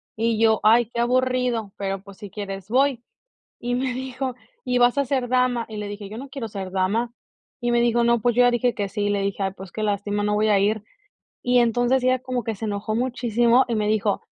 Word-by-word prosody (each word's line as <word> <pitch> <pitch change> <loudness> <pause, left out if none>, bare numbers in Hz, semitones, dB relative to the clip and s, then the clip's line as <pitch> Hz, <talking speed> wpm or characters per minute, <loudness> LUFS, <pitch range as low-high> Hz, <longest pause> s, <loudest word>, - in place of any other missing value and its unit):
Y 225 0 0
yo: 220 -1 +4
"Ay, 230 +3 +6
qué 235 - 0
aburrido, 250 -3 0
pero, 195 -1 -3
pues, 200 0 -14
si 205 -2 -8
quieres 195 -1 -7
voy". 260 0 +2 0.6
Y 245 +1 -2
me 255 0 -1
dijo: 260 0 -4 0.3
"Y 250 0 +1
vas 245 +1 +4
a 280 - +3
ser 255 -2 -1
dama". 250 -2 +1
Y 220 - -8
le 210 - -4
dije: 205 0 -7
"Yo 215 +3 -8
no 275 +2 -8
quiero 260 -3 -5
ser 195 -3 -6
dama". 195 +6 0 0.5
Y 240 -1 0
me 240 - +3
dijo: 235 0 +2
"No, 235 0 +3
pues, 240 +1 +1
yo 245 - +6
ya 245 - +5
dije 240 0 +1
que 200 -1 -2
sí". 205 +1 -3
Y - - +1
le 200 -1 0
dije: 200 0 -2
"Ay, 190 -1 -1
pues, 190 -2 -10
qué 215 - -4
lástima, 205 0 -1
no 210 0 +1
voy 215 +1 +2
a 205 -2 +4
ir". 210 +1 0 0.6
Y 245 0 +3
entonces, 245 +2 +2
ella 255 0 +3
como 255 -1 -3
que 225 - -2
se 220 +3 -5
enojó 210 +1 -2
muchísimo 240 0 +2
y 235 - -2
me 210 -1 0
dijo: 210 -2 +1
230 Hz, 240 wpm, -23 LUFS, 205-245 Hz, 0.6 s, Ay